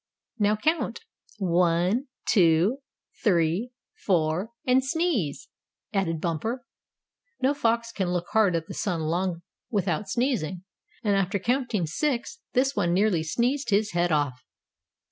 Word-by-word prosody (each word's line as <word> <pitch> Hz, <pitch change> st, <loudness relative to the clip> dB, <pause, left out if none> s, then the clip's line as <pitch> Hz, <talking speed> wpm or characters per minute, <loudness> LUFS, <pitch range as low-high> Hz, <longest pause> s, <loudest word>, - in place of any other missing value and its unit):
"Now 210 Hz, 0 st, +3 dB
count 315 Hz, -, 0 dB, 0.4 s
one, 180 Hz, +6 st, +2 dB, 0.2 s
two, 180 Hz, +6 st, +4 dB, 0.4 s
three, 180 Hz, +2 st, +2 dB, 0.3 s
four, 175 Hz, +2 st, +1 dB, 0.2 s
and 255 Hz, +1 st, +4 dB
sneeze," 275 Hz, -, -1 dB, 0.5 s
added 175 Hz, -5 st, 0 dB
Bumper. 220 Hz, -, -2 dB, 0.7 s
No 265 Hz, +2 st, +2 dB
fox 230 Hz, -4 st, 0 dB
can 190 Hz, -5 st, -2 dB
look 175 Hz, -1 st, -1 dB
hard 210 Hz, -5 st, +4 dB
at 165 Hz, -1 st, -1 dB
the -, -, -8 dB
sun 175 Hz, -5 st, -1 dB
long 170 Hz, +2 st, -1 dB, 0.3 s
without 195 Hz, -2 st, -1 dB
sneezing, 205 Hz, -, -1 dB, 0.4 s
and 205 Hz, -2 st, +2 dB
after 195 Hz, +1 st, +1 dB
counting 235 Hz, -3 st, 0 dB
six 280 Hz, -, -2 dB
this 270 Hz, +2 st, +2 dB
one 175 Hz, 0 st, +1 dB
nearly 195 Hz, -4 st, +3 dB
sneezed 245 Hz, -, 0 dB
his 210 Hz, +1 st, +2 dB
head 175 Hz, 0 st, +1 dB
off. 145 Hz, -4 st, 0 dB
195 Hz, 125 wpm, -26 LUFS, 170-240 Hz, 0.7 s, two